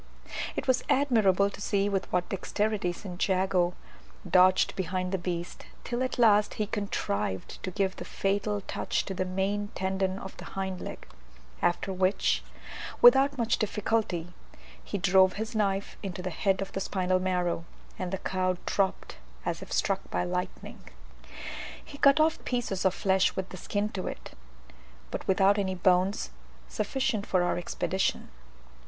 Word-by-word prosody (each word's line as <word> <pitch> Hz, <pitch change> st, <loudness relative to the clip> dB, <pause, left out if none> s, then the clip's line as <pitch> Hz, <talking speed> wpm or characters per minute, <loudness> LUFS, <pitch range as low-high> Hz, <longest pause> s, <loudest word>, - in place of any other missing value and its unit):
It -, -, -3 dB
was 255 Hz, -1 st, +3 dB
admirable 210 Hz, -8 st, +3 dB
to 200 Hz, -, -10 dB
see 200 Hz, 0 st, +1 dB
with 195 Hz, -2 st, -2 dB
what 180 Hz, 0 st, +1 dB
dexterity 205 Hz, 0 st, -1 dB
St. 180 Hz, 0 st, -8 dB
Jago 185 Hz, -2 st, +2 dB, 0.5 s
dodged 185 Hz, +1 st, +5 dB
behind 185 Hz, 0 st, -2 dB
the 190 Hz, -, 0 dB
beast, 175 Hz, -1 st, -4 dB, 0.2 s
till 240 Hz, +1 st, -2 dB
at 255 Hz, 0 st, -1 dB
last 210 Hz, -3 st, +4 dB
he 215 Hz, -, 0 dB
contrived 105 Hz, -, -3 dB
to -, -, -3 dB
give 190 Hz, 0 st, -1 dB
the -, -, -5 dB
fatal 205 Hz, +1 st, -1 dB
touch -, -, -2 dB
to 195 Hz, -, -4 dB
the 185 Hz, 0 st, -1 dB
main 195 Hz, +3 st, -1 dB
tendon 190 Hz, 0 st, -1 dB
of 190 Hz, -1 st, -8 dB
the -, -, -9 dB
hind 190 Hz, -1 st, -2 dB
leg -, -, -7 dB, 0.6 s
after 190 Hz, +2 st, +1 dB
which, 185 Hz, -, +1 dB, 0.6 s
without 270 Hz, +3 st, +7 dB
much 235 Hz, -1 st, +1 dB
difficulty, 205 Hz, -5 st, -1 dB, 0.5 s
he 205 Hz, -, -3 dB
drove 190 Hz, 0 st, +5 dB
his 220 Hz, +2 st, -4 dB
knife 200 Hz, -2 st, 0 dB
into 185 Hz, -2 st, -5 dB
the 185 Hz, -, -3 dB
head 195 Hz, +3 st, +1 dB
of 195 Hz, -, -9 dB
the -, -, -3 dB
spinal 185 Hz, -1 st, 0 dB
marrow, 180 Hz, -2 st, 0 dB, 0.4 s
and 185 Hz, -1 st, -3 dB
the 190 Hz, -, -1 dB
cow 185 Hz, -1 st, -1 dB
dropped 195 Hz, -2 st, -1 dB, 0.3 s
as -, -, -2 dB
if -, -, -10 dB
struck -, -, 0 dB
by 90 Hz, 0 st, 0 dB
lightning. 90 Hz, -, -4 dB, 1.1 s
He 280 Hz, -, -11 dB
cut 280 Hz, +2 st, +6 dB
off 315 Hz, +1 st, +2 dB
pieces 235 Hz, -7 st, -2 dB
of 190 Hz, -, +3 dB
flesh 190 Hz, -1 st, +2 dB
with 190 Hz, 0 st, -3 dB
the -, -, -8 dB
skin 205 Hz, +3 st, -1 dB
to 190 Hz, -3 st, -4 dB
it, -, -, -7 dB, 0.8 s
but -, -, -5 dB
without 195 Hz, +2 st, +4 dB
any 190 Hz, -2 st, -1 dB
bones, 185 Hz, -, +2 dB, 0.4 s
sufficient 220 Hz, -, -1 dB
for 185 Hz, -2 st, +2 dB
our 175 Hz, -, 0 dB
expedition. 190 Hz, +2 st, -1 dB
190 Hz, 160 wpm, -29 LUFS, 185-205 Hz, 1.1 s, without